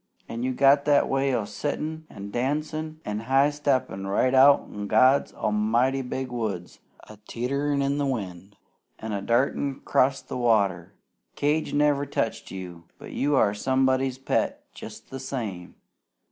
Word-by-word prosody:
An' 115 - -5
you 130 +1 0
got 140 +2 +4
that 145 -1 +4
way 135 0 +1
o' 115 -5 0
swingin' 155 +8 -4
an' 100 0 -9
dancin' 155 +5 -2
an' 105 0 -3
high 135 +5 +3
steppin' 130 -9 -1
right 125 +6 +1
out 135 +2 +7
in 105 0 -7
God 130 +6 +4
A'mighty's 120 +5 0
big 130 -1 -4
woods, 105 -8 -4 0.3
a 110 - -12
teeterin' 140 +4 -1
in 140 +1 0
the 140 - 0
wind, 95 -6 -5 0.4
an' 110 - -6
a 100 - -2
dartin' 130 +4 0
'crost 130 0 +1
the - - -4
water. 100 -7 +1 0.4
Cage 150 +1 0
never 145 -1 +2
touched 115 -5 -2
you! 90 -3 -8
But - - -11
you 145 +1 0
are 100 -6 +3
somebody's 130 +3 +1
pet 135 - -1
jest - - -11
the 135 - -6
same. 110 -10 -5
130 Hz, 155 wpm, -25 LUFS, 105-140 Hz, 0.4 s, out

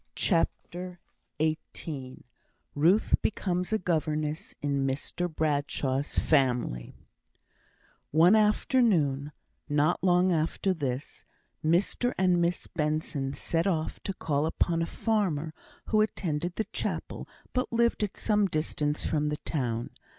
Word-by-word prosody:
CHAPTER 180 0 -1 0.4
XVIII 155 -3 -3 0.5
Ruth 170 +9 +3
Becomes 180 -2 -1
a 220 - +3
Governess 155 -4 -2
in 140 -1 0
Mr 155 +6 -2
Bradshaw's 145 -3 -1
Family 125 - +1 1.1
One 170 +7 +6
afternoon, 210 - +2 0.4
not 150 +5 +2
long 180 0 +4
after 165 +4 +1
this, 140 -5 -4 0.4
Mr 180 +9 +1
and 180 -2 +3
Miss 170 +1 0
Benson 150 -3 -2
set 165 +5 0
off 160 -5 -1
to 195 - -4
call 150 -2 0
upon 165 0 0
a 165 - 0
farmer, 185 -9 0 0.4
who 215 -1 +4
attended 175 -5 -1
the 220 - -1
chapel, - - -3 0.3
but 255 0 -1
lived 235 -1 +2
at 205 -2 -2
some 210 -2 +2
distance 155 -2 -1
from 150 -1 +1
the 150 - -2
town. 120 -7 -3
160 Hz, 115 wpm, -28 LUFS, 145-185 Hz, 1.1 s, One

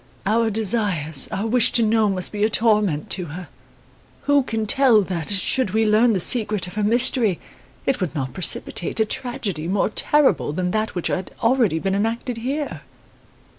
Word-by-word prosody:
Our 225 +3 +1
desires, 200 - 0
our 200 - -3
wish 235 +1 +2
to 235 - +3
know 220 -1 +2
must 185 -2 -2
be 210 -1 -2
a 215 - +3
torment 210 -9 +1
to 180 - -2
her. 175 +3 -9 0.7
Who 285 0 +3
can 225 -4 -3
tell 235 -2 +3
that, 175 -4 -4
should 205 +2 0
we 220 0 +2
learn 220 +2 +3
the 190 - 0
secret 210 -1 +3
of 180 - -10
her 215 - -3
mystery, 230 -3 +1 0.5
it 270 -6 -1
would 175 -3 -3
not 130 -4 -4
precipitate 175 - 0
a 220 - +3
tragedy 210 -9 -2
more 195 +3 0
terrible 290 - +2
than 180 +2 -2
that 215 0 -2
which 175 - -4
had 190 -1 -3
already 230 -8 +2
been 190 +4 -2
enacted 230 +4 -2
here? 275 +5 -4
215 Hz, 175 wpm, -21 LUFS, 185-230 Hz, 0.7 s, to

